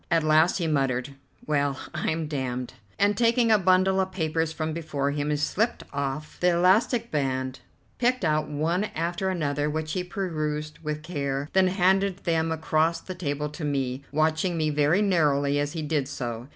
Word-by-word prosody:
At 165 - +3
last 155 +2 +4
he 175 - -1
muttered, 135 -3 0 0.3
"Well, 145 -2 0 0.2
I'm 160 0 -1
damned!" 130 -4 -3 0.2
and, 205 +1 +3
taking 230 +1 +3
a 215 - +6
bundle 185 +1 +3
of 190 0 0
papers 160 -2 -1
from 160 -1 -3
before 150 -4 -2
him, 145 0 -2
he 150 - +1
slipped 210 +10 0
off 140 +2 -4
the 180 0 +3
elastic 220 +7 +3
band, 130 -3 -1 0.4
picked 250 -4 +1
out 155 -1 +1
one 165 +7 0
after 175 +3 -1
another 150 -5 -1
which 155 0 -3
he 180 +2 -1
perused 155 -5 -3
with 150 -1 -4
care, 140 -3 -3
then 190 -1 +5
handed 190 +1 +2
them 165 -1 +1
across 160 +1 +1
the 185 - -7
table 150 -4 -3
to 150 +2 -8
me, 135 -2 -1
watching 160 +4 +1
me 155 -1 +1
very 150 +7 +3
narrowly 145 -7 +2
as 145 0 -1
he 160 -2 -3
did 150 -3 0
so. 120 -3 -5
155 Hz, 175 wpm, -26 LUFS, 145-180 Hz, 0.4 s, a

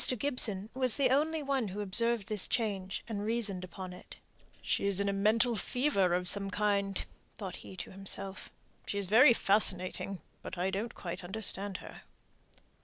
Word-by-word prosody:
Gibson 220 -6 0
was 255 -3 +2
the 265 -3 +3
only 305 +3 +2
one 270 -5 0
who 195 +2 -6
observed 220 +2 +2
this 215 -4 +1
change, 195 -5 -2
and 210 -3 -3
reasoned 210 -4 0
upon 185 +1 -7
it. 180 - -12 0.5
"She's 200 -1 +1
in 200 - +1
a 200 - +1
mental 225 +4 +3
fever 200 -4 +1
of 180 0 -1
some 195 +1 +1
kind," 200 -1 0 0.3
thought 195 -4 -6
he 190 - -11
to - - -6
himself. 195 0 -3 0.4
"She's 200 -1 -2
very 235 +7 +7
fascinating, 195 -2 +1 0.2
but 185 - -7
I 185 +2 0
don't 215 +5 -3
quite 175 0 -6
understand 195 0 -2
her." - - -11
200 Hz, 160 wpm, -32 LUFS, 190-230 Hz, 0.5 s, very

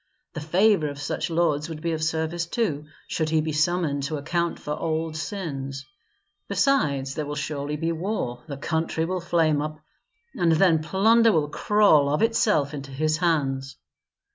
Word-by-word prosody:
The 160 - -5
favor 175 +1 +3
of 145 0 -8
such 145 - -3
lords 160 -2 +1
would 160 -2 -6
be 170 +1 -2
of 160 -1 -2
service, 160 +2 -1
too, 170 -8 -1 0.2
should 160 -1 -1
he 160 0 +2
be 155 0 -1
summoned 155 -1 +1
to 155 +1 -3
account 170 +4 -1
for 150 - -7
old 160 0 -2
sins. 145 -5 -5 0.6
Besides, 140 - +1
there 150 -1 -4
will 145 - -4
surely 145 0 -3
be 165 +2 -1
war, 165 - -3
the 140 -3 -6
country 160 +2 -1
will 185 +1 -2
flame 160 -3 +2
up, 155 0 -4 0.6
and 170 -2 +2
then 160 -1 +4
plunder 220 +7 +4
will 150 -5 +1
crawl 180 -6 +4
of 150 - +1
itself 210 -10 +2
into 140 -1 -6
his 155 +3 0
hands. 135 -6 -1
155 Hz, 165 wpm, -25 LUFS, 145-170 Hz, 0.6 s, then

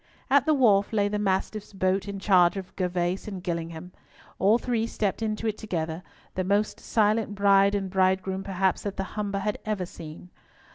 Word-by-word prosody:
At 280 0 +4
the 310 - +4
wharf 205 -7 +4
lay 205 -1 +2
the 210 0 -2
Mastiff's 205 +1 -1
boat 190 +1 0
in 200 0 -4
charge 185 -2 +4
of 190 -1 -7
Gervas 180 +1 -1
and 190 -4 -6
Gillingham. 170 0 -4 0.5
All 205 +4 +5
three 235 -2 -1
stepped 205 -2 -2
into 215 0 -2
it 215 -1 -1
together, 165 -5 -3 0.3
the 185 - -1
most 200 +3 0
silent 215 -1 +1
bride 200 0 +4
and 195 -1 -1
bridegroom 190 0 +1
perhaps 190 -1 0
that 200 -1 -5
the 195 - -1
Humber 205 -2 -2
had 205 +1 -2
ever 210 -4 -2
seen. 170 +1 -11
195 Hz, 180 wpm, -26 LUFS, 185-210 Hz, 0.5 s, All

